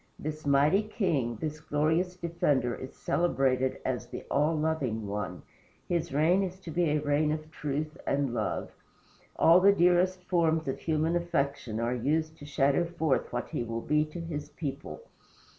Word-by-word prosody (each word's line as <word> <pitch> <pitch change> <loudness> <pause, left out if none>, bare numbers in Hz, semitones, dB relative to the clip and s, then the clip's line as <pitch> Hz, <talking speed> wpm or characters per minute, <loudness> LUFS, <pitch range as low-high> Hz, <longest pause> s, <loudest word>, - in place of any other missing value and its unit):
This 155 0 -5
mighty 145 +8 +4
king, 170 - -1
this 155 -1 -4
glorious 160 +4 0
defender, 155 -8 0
is 130 - -8
celebrated 130 -6 +1
as 125 -2 -2
the - - -7
All 150 +3 +2
Loving 150 -8 -1
One. 100 -3 -4 0.4
His 170 -1 -1
reign 160 +7 +3
is 190 -1 -4
to 170 - -7
be 175 +2 +1
a 150 - +2
reign 150 +1 +1
of 155 0 -4
truth 150 +2 -3
and 140 -3 0
love. - - -2 0.6
All 170 +2 +6
the 195 +2 +6
dearest 180 0 +3
forms 165 -3 +1
of 135 - -2
human 160 +1 0
affection 140 -9 -1
are 120 +1 0
used 155 +6 0
to 145 - -10
shadow 140 +3 +2
forth 160 -5 -1
what 120 0 -3
he - - -2
will 115 0 -3
be 150 +4 +2
to 155 +3 -8
his 150 -3 -5
people. 150 - -6
155 Hz, 165 wpm, -29 LUFS, 135-170 Hz, 0.6 s, All